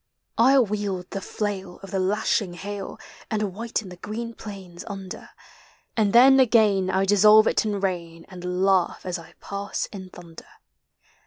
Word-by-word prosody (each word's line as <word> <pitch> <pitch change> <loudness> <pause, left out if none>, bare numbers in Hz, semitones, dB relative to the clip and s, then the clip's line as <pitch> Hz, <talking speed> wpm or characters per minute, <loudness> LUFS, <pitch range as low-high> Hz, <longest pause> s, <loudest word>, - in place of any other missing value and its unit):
I 265 +4 +6
wield 205 -6 -1
the 195 - -4
flail 195 -3 -4
of 195 - -9
the 195 - -1
lashing 190 -1 0
hail. 200 +2 -6 0.3
And 210 -3 -1
whiten 220 -1 -4
the 180 - -11
green 230 +5 -6
plains 195 -6 -9
under; 195 -2 -8 0.7
And 215 -3 +2
then 265 +4 +7
again 215 -6 +4
I 190 +1 +1
dissolve 210 +2 +6
it - - +1
in 205 -2 -1
rain. 170 -4 -3
And 180 0 -3
laugh 190 -3 +1
as 180 -1 -3
I 165 +1 -15
pass 200 0 -4
in 190 -2 -8
thunder. 170 -2 -13
195 Hz, 155 wpm, -24 LUFS, 185-215 Hz, 0.7 s, then